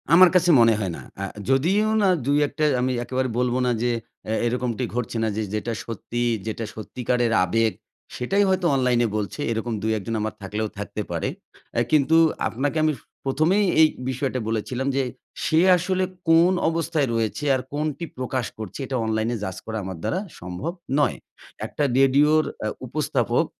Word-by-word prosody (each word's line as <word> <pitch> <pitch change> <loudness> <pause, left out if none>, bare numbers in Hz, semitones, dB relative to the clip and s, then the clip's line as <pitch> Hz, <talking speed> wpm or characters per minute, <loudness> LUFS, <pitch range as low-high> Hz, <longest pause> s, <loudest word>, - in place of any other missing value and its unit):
আমার 180 +2 +9
কাছে 180 -1 +4
মনে 115 -1 +6
হয় 95 -4 -2
না। - - -9 0.2
আ - - -1 0.3
যদিও 180 +11 +3
না 200 - +4 0.2
২-১ 145 +1 +2
টা - - +2 0.2
আমি 130 +1 +1
একেবারে 130 +1 -1
বলব 125 0 +1
না 125 - +2
যে 120 - +2 0.4
এ - - +1
এরকমটি 125 0 -1
ঘটছে 120 -1 -2
না - - +2
যে 110 - 0
যেটা 110 +2 -2
সত্যি, 115 +2 -4 0.2
যেটা 110 +1 -3
সত্যিকারের 120 +2 -1
আবেগ 115 +4 +2 0.4
সেটাই 195 +12 +1
হয়তো 185 -1 +1
অনলাইনে 125 -2 +2
বলছে 105 +6 -4
এরকম 115 +1 -2
২ 110 - 0
১ 100 - -6
জন 115 - -1
আমার 110 0 -2
থাকলেও 105 +2 -2
থাকতে 105 +1 -4
পারে। - - -1 0.5
আ - - +4
কিন্তু 155 +1 +4 0.3
আপনাকে 140 +6 -2
আমি 155 0 +3 0.3
১ম 140 +4 +1
এই 205 - +3 0.2
এই 160 - +8 0.2
বিষয়টা 130 0 -1
বলেছিলাম 125 +4 -2
যে, 135 - +2 0.4
সে 160 - +3 0.2
আসলে 185 +2 0 0.3
কোন 165 +2 +6 0.2
অবস্থায় 165 -3 0
রয়েছে 115 +5 -1
আর 130 - -1
কোনটি 155 +2 -2
প্রকাশ 130 -1 -2
করছে 110 +2 -7
এটা 130 - -4
অনলাইনে 110 +2 0
জাজ 95 -2 -4
করা 110 0 -4
আমার 95 -2 -5
দ্বারা 185 - 0 0.2
সম্ভব 90 - -4 0.3
নয়। 145 - +2 0.5
একটা 150 - -3 0.2
রেডিওর 145 +3 +5 0.2
আ - - +1 0.2
উপস্থাপক - - 0
125 Hz, 175 wpm, -24 LUFS, 110-150 Hz, 0.5 s, আমার